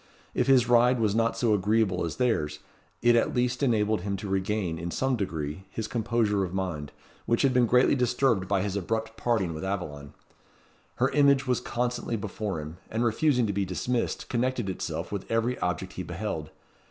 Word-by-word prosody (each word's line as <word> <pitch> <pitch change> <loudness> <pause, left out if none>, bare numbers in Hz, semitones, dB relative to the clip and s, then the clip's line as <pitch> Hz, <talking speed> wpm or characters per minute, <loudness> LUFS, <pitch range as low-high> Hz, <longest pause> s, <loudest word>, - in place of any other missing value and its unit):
If - - +1
his 130 -3 +5
ride 120 +1 +4
was 110 -3 +2
not 115 +1 +1
so 115 -3 +2
agreeable 105 -1 +2
as 80 - -4
their's, 110 -13 0 0.5
it 120 0 +6
at 115 - +2
least 125 0 0
enabled 110 -6 +2
him 100 +1 -2
to 105 - -6
regain, 95 -3 -1
in 85 +1 -4
some 130 +8 0
degree, 80 -4 -4
his 110 -1 -4
composure 110 -3 +1
of 90 0 -4
mind, 85 -7 -3 0.4
which 115 - +2
had 135 -2 +3
been 125 -2 +4
greatly 125 +2 +4
disturbed 125 -6 +1
by 100 -1 +1
his 100 -1 -2
abrupt 110 +3 -2
parting 110 -8 0
with 80 - -6
Aveline. 75 -7 -4 0.8
Her 130 +2 +2
image 140 -1 +4
was 125 -2 0
constantly 120 -1 -2
before 100 -3 -3
him, 75 +3 -7
and 115 +2 0
refusing 125 +2 +2
to 100 - -1
be 100 +1 0
dismissed, 115 +6 -2
connected 120 -4 -1
itself - - -4
with 100 -2 -5
every 115 +2 0
object - - -2
he - - -5
beheld. - - -4
110 Hz, 185 wpm, -27 LUFS, 95-120 Hz, 0.8 s, it